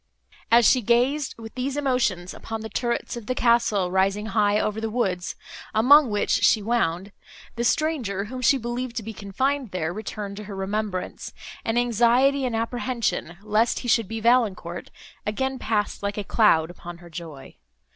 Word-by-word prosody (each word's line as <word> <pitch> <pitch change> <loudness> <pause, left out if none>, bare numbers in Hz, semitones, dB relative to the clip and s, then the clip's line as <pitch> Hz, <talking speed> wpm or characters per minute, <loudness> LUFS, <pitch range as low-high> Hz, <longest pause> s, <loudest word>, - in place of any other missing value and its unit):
As 235 0 +6
she 255 - +4
gazed, 250 +6 +1
with 225 -1 -10
these 265 +2 -3
emotions, 250 -11 0
upon 225 0 -6
the 220 - -6
turrets 240 +1 -2
of 235 -3 -8
the 255 - -1
castle, 235 -7 +2
rising 195 +3 +1
high 210 -1 +2
over 215 +1 -1
the 225 - -2
woods, 190 -6 -1 0.4
among 270 +5 +6
which 205 -1 0
she 220 - +4
wound, 200 -4 -1 0.4
the 235 - -2
stranger, 240 -8 0
whom 255 +4 -6
she 260 +3 +4
believed 240 0 -4
to 225 - -3
be 225 +2 -6
confined 260 +6 -2
there, 175 -2 -2
returned 205 -1 -6
to 210 - -7
her 200 0 -7
remembrance, 195 -1 -3 0.3
and 225 +1 -1
anxiety 245 +4 +3
and 245 -3 -1
apprehension, 230 -6 -2
lest 215 +2 +1
he 245 - -6
should 230 -2 +3
be 225 +2 -4
Valancourt, 215 -7 +1 0.3
again 265 +5 -2
passed 215 -2 -1
like 200 0 -3
a 210 - -2
cloud 175 -6 +3
upon 175 -1 -10
her 175 0 -14
joy. 155 -4 -9
220 Hz, 170 wpm, -24 LUFS, 200-245 Hz, 0.4 s, As